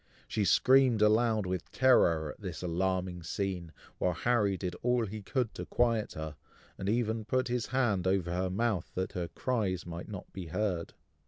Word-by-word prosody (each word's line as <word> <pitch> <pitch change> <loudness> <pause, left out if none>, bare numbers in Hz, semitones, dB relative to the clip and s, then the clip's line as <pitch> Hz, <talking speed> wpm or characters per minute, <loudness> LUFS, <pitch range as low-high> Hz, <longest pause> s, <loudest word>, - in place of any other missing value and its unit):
She 105 - 0
screamed 130 -1 +5
aloud 110 -1 +3
with 90 -1 -4
terror 85 - +4
at - - -15
this 90 -4 -6
alarming 90 0 -1
scene, 90 -1 -3 0.3
while 90 - +1
Harry 105 0 +1
did 90 -2 -3
all 125 -1 +2
he 105 +1 -6
could 120 +2 -1
to - - -6
quiet 115 -3 +1
her, 80 -1 -6 0.4
and 95 - -3
even 110 0 0
put 130 +3 0
his 120 -3 -1
hand 110 -9 +1
over 95 -2 +1
her 90 +1 0
mouth, 100 -1 0
that 95 0 -2
her 90 -3 -3
cries 100 -2 -1
might 85 +2 -7
not 100 -4 -8
be 95 -3 -6
heard. 90 -1 -2
100 Hz, 175 wpm, -31 LUFS, 90-115 Hz, 0.4 s, screamed